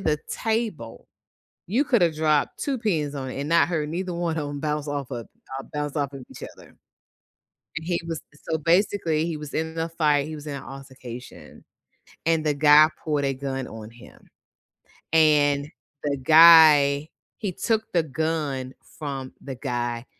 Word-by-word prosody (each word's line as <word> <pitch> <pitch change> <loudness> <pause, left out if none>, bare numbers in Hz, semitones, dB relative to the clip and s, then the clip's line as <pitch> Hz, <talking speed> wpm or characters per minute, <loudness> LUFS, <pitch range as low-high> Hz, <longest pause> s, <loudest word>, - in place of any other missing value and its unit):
the 155 -5 0
table 220 - -3 0.6
you 240 +10 +2
could 240 -8 +2
have 165 -3 +2
dropped 155 -2 +1
2 275 -2 -1
pins 160 -10 -1
on 130 -1 -5
it 135 - -6
and 140 - -3
not 170 +1 +4
heard, 155 -4 -2
neither 180 +2 -3
one 170 -1 -2
of 145 -2 -3
'em 145 - -5
bounce 150 0 -2
off 145 -3 -4
of 120 -2 -6 0.3
uh, - - -7
bounce 145 0 -3
off 140 -2 -2
of 130 -2 -9
each - - -11
other. - - -12 1.1
And 160 +1 -5
he 175 -1 0
was 165 -2 -4 0.3
so, 160 - +1
basically 165 -1 +1
he 165 -2 -3
was 150 -1 -9
in 160 0 -2
the 165 0 -2
fight 150 -3 +1
he 155 - -6
was 150 0 -9
in 145 - -4
an 135 - -7
altercation, 130 -2 -11 0.6
and 165 -1 +2
the 150 - +2
guy 150 +1 +7 0.2
pulled 150 -3 0
a 135 - 0
gun 135 -1 -4
on 110 0 -9
him, 120 +1 -17 0.9
and 145 -2 +4 0.3
the 140 -1 -1
guy 155 -1 +7 0.3
he 200 - -3
took 220 +2 -1
the 170 -2 +3
gun 150 -3 -3 0.2
from 135 -4 -5
the 135 -2 -7
guy, 120 -2 -3
150 Hz, 175 wpm, -24 LUFS, 140-165 Hz, 1.1 s, guy